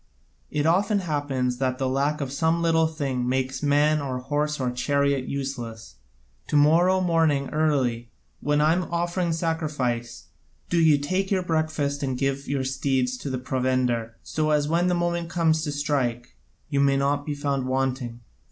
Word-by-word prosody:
It 150 Hz, 0 st, -1 dB
often 200 Hz, +5 st, +3 dB
happens 140 Hz, -6 st, -1 dB
that 130 Hz, -1 st, 0 dB
the 130 Hz, -, -1 dB
lack 140 Hz, +3 st, 0 dB
of 135 Hz, -2 st, -3 dB
some 160 Hz, +4 st, +1 dB
little 160 Hz, -1 st, +3 dB
thing 135 Hz, -6 st, -2 dB
makes 130 Hz, 0 st, -1 dB
man 150 Hz, +1 st, +3 dB
or 130 Hz, -2 st, -3 dB
horse 150 Hz, +3 st, -1 dB
or 125 Hz, -2 st, 0 dB
chariot 140 Hz, +1 st, 0 dB
useless. 120 Hz, -, -5 dB, 0.5 s
To -, -, -2 dB
morrow 175 Hz, +6 st, +4 dB
morning 160 Hz, -6 st, +2 dB
early, 130 Hz, -7 st, 0 dB, 0.3 s
while 145 Hz, +1 st, +1 dB
I 155 Hz, +1 st, +4 dB
am 180 Hz, +1 st, 0 dB
offering 175 Hz, 0 st, 0 dB
sacrifice, 150 Hz, -8 st, -2 dB, 0.4 s
do 170 Hz, -, +3 dB
you 160 Hz, -3 st, +5 dB
take 185 Hz, +7 st, -1 dB
your 190 Hz, -2 st, +1 dB
breakfast 155 Hz, -4 st, -1 dB
and 130 Hz, -3 st, -2 dB
give 135 Hz, +1 st, -1 dB
your 140 Hz, -1 st, -1 dB
steeds 130 Hz, -1 st, 0 dB
their 130 Hz, 0 st, -3 dB
provender, 125 Hz, -3 st, -1 dB
so 155 Hz, 0 st, -1 dB
that 150 Hz, -1 st, +2 dB
when 170 Hz, +3 st, +2 dB
the 180 Hz, -, +2 dB
moment 170 Hz, -1 st, -1 dB
comes 165 Hz, -2 st, +2 dB
to 150 Hz, -, -2 dB
strike 130 Hz, -, -2 dB, 0.3 s
you 140 Hz, -, -1 dB
may 140 Hz, 0 st, +3 dB
not 140 Hz, +1 st, +1 dB
be 145 Hz, 0 st, -3 dB
found 140 Hz, -2 st, -1 dB
wanting. 130 Hz, -2 st, -2 dB
145 Hz, 165 wpm, -25 LUFS, 130-160 Hz, 0.5 s, you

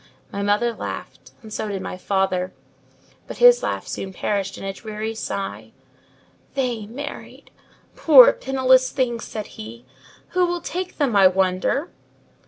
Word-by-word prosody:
My 200 Hz, -, -4 dB
mother 210 Hz, +4 st, +1 dB
laughed, -, -, -7 dB
and 215 Hz, -1 st, -10 dB
so 215 Hz, -, -3 dB
did 195 Hz, -2 st, -4 dB
my -, -, -5 dB
father: 185 Hz, -1 st, -1 dB, 0.8 s
but -, -, -8 dB
his -, -, +7 dB
laugh -, -, -3 dB
soon 190 Hz, -, -5 dB
perished 195 Hz, +1 st, -2 dB
in -, -, -9 dB
a 195 Hz, 0 st, -3 dB
dreary 215 Hz, +1 st, -5 dB
sigh. 200 Hz, -3 st, -5 dB, 0.8 s
"They 245 Hz, -6 st, -2 dB
married—poor 295 Hz, -, +2 dB
penniless 260 Hz, -, +3 dB
things!" 240 Hz, -4 st, -2 dB
said 215 Hz, -2 st, -6 dB, 0.2 s
he; 115 Hz, +3 st, -10 dB, 0.4 s
"who 365 Hz, 0 st, +2 dB
will 350 Hz, 0 st, -2 dB
take 365 Hz, +2 st, -5 dB
them 275 Hz, -7 st, +1 dB
I 195 Hz, -2 st, +7 dB
wonder!" 185 Hz, -, 0 dB
220 Hz, 140 wpm, -22 LUFS, 195-270 Hz, 0.8 s, his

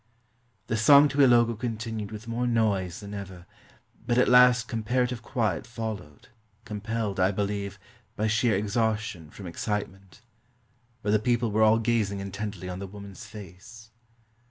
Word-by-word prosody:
The 115 Hz, -, -1 dB
song 140 Hz, +6 st, +7 dB
to 140 Hz, -, -3 dB
Ilogo 120 Hz, -3 st, +5 dB
continued 110 Hz, -3 st, -4 dB
with 110 Hz, +1 st, -8 dB
more 120 Hz, +2 st, -1 dB
noise 105 Hz, -6 st, 0 dB
than 100 Hz, 0 st, -8 dB
ever; 95 Hz, -3 st, -8 dB, 0.6 s
but 120 Hz, -, +1 dB
at 125 Hz, -, +4 dB
last 125 Hz, -1 st, +6 dB
comparative 125 Hz, +2 st, -1 dB
quiet 115 Hz, -, -2 dB
followed, 110 Hz, -, -7 dB, 0.4 s
compelled, 105 Hz, -1 st, -3 dB
I 90 Hz, +1 st, +4 dB
believe, 100 Hz, 0 st, -3 dB, 0.4 s
by 110 Hz, -, -1 dB
sheer 110 Hz, 0 st, +2 dB
exhaustion 105 Hz, -4 st, -1 dB
from 95 Hz, +5 st, -11 dB
excitement. 95 Hz, +1 st, -5 dB, 0.8 s
But 105 Hz, -, 0 dB
the 110 Hz, -, +4 dB
people 120 Hz, 0 st, +1 dB
were 110 Hz, +2 st, +1 dB
all 110 Hz, +1 st, +6 dB
gazing 110 Hz, -3 st, 0 dB
intently 100 Hz, -1 st, -5 dB
on 90 Hz, 0 st, -5 dB
the 100 Hz, -, -6 dB
woman's 100 Hz, +1 st, -10 dB
face. 105 Hz, +2 st, -12 dB
110 Hz, 145 wpm, -27 LUFS, 100-115 Hz, 0.8 s, song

